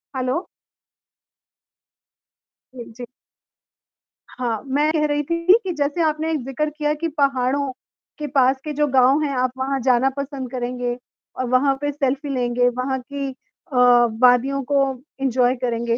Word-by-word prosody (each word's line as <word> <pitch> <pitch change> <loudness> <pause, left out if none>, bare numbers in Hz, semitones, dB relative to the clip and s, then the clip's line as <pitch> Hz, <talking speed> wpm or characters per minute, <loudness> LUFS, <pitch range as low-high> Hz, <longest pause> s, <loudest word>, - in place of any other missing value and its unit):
Hello? 255 +5 0 2.4
जी, 240 - -7
जी। 245 +1 -8 1.3
हाँ, 235 -4 -2
मैं 290 +3 +1
कह 300 -1 +2
रही 295 0 0
थी 335 +4 +3
कि 375 - -2
जैसे 295 +2 -1
आपने 315 +1 0
जिक्र 270 +4 -2
किया 300 0 -1
कि 335 - 0
पहाड़ों 275 0 +1 0.5
के 300 - -3
पास 265 -1 +3
के 305 - -4
जो 295 +1 +1
गाँव 265 +2 +4
हैं 280 -3 -1
आप 255 0 +1
वहाँ 270 +1 -1
जाना 255 +1 +3
पसंद 275 -2 -5
करेंगे 245 -1 -3 0.4
और 255 - 0
वहाँ 270 +2 +3
पे 290 - -1
सेल्फी 280 0 -2
लेंगे, 245 -1 +1
वहाँ 255 +2 -2
की 280 +2 -5 0.5
अ, - - -3 0.5
वादियों 255 +2 +4
को 280 -1 +4 0.4
एन्जॉय 255 -1 +2
करेंगे। 235 -2 -1
270 Hz, 145 wpm, -21 LUFS, 250-290 Hz, 2.4 s, गाँव